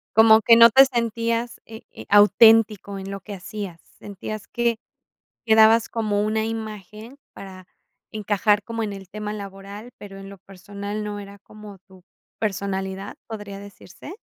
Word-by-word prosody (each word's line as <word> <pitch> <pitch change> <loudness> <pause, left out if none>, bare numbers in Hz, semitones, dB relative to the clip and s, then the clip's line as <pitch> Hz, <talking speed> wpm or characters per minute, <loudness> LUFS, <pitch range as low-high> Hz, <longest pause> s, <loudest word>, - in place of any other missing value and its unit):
Como 220 0 +7
que 230 +2 +6
no 230 0 +8
te 265 +4 +7
sentías, 235 -1 -2
eh 220 0 -11
eh, - - -12
auténtico 210 -1 +4
en 195 0 -8
lo 195 - -6
que 205 +2 -10
hacías. 190 -2 -8 0.2
Sentías 205 +1 -8
que 235 -1 -1 0.7
que 220 - +3
dabas 220 +1 +5
como 210 -3 -2
una 220 +1 -1
imagen 220 +2 -8
para 185 -2 -12 0.4
encajar 210 0 0
como 230 +1 -5
en 215 -2 -3
el 195 -1 -10
tema 210 +2 -6
laboral, 200 +2 -10
pero 195 -1 -11
en 195 0 -11
lo 200 - -13
personal 200 +2 -8
no 205 0 -5
era 200 0 -11
como 210 0 -14
tu 190 -2 -19 0.4
personalidad, 195 -1 -4
¿podría 205 -3 -8
decirse? 200 - -12
210 Hz, 155 wpm, -22 LUFS, 195-220 Hz, 0.7 s, no